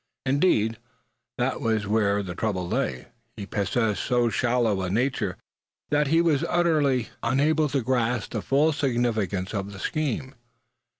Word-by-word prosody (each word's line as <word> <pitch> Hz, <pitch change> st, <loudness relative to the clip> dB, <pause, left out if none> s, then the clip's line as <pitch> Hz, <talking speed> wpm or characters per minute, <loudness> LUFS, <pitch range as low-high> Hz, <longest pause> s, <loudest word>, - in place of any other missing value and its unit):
Indeed, 130 Hz, -, +2 dB, 0.6 s
that -, -, -1 dB
was 110 Hz, -2 st, 0 dB
where 100 Hz, -1 st, +1 dB
the 90 Hz, -2 st, -5 dB
trouble 95 Hz, -3 st, -2 dB
lay; 65 Hz, -6 st, -2 dB, 0.3 s
he 100 Hz, -, -5 dB
possessed 105 Hz, +2 st, 0 dB
so 120 Hz, -2 st, +2 dB
shallow 115 Hz, -3 st, +1 dB
a 90 Hz, -, -2 dB
nature 115 Hz, -2 st, -1 dB, 0.5 s
that 150 Hz, 0 st, +2 dB
he 165 Hz, +4 st, +4 dB
was 160 Hz, -5 st, +2 dB
utterly 150 Hz, -8 st, +2 dB
unable 150 Hz, +3 st, +2 dB
to 135 Hz, -2 st, -1 dB
grasp 120 Hz, -2 st, 0 dB
the 110 Hz, -, -2 dB
full 145 Hz, +7 st, +2 dB
significance 115 Hz, -, -1 dB
of 100 Hz, -1 st, -3 dB
the -, -, -9 dB
scheme. 135 Hz, 0 st, -2 dB
120 Hz, 140 wpm, -25 LUFS, 105-140 Hz, 0.6 s, he